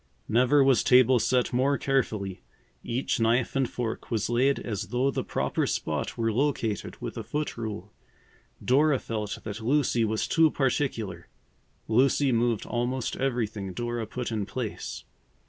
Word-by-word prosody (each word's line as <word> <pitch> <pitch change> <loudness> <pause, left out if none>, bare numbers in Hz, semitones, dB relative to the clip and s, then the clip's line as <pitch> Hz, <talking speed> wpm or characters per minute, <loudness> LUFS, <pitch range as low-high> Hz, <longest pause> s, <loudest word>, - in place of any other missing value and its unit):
Never 130 +5 +4
was 135 -3 +4
table 125 0 +5
set 125 +2 +1
more 135 +3 +2
carefully. 110 -8 -1 0.4
Each 120 +2 -1
knife 115 +3 +2
and 135 -2 +1
fork 120 -2 -4
was 115 0 -1
laid 130 +4 +3
as 105 -2 -4
though 125 +5 +1
the - - -2
proper - - -1
spot - - -2
were 115 -1 0
located 120 -5 -1
with - - -5
a - - -5
foot 150 0 -3
rule. 105 -4 -6 0.7
Dora 145 +2 +4
felt 105 -4 -4
that 110 +1 -6
Lucy 120 -1 +2
was 110 0 0
too 165 -1 +4
particular. 120 - -1 0.6
Lucy 135 +4 +3
moved 115 -2 +1
almost 120 +1 -2
everything 110 -7 -2
Dora 120 +1 -3
put 125 +2 -4
in 105 -3 -2
place. 120 -3 -5
120 Hz, 145 wpm, -27 LUFS, 110-130 Hz, 0.7 s, table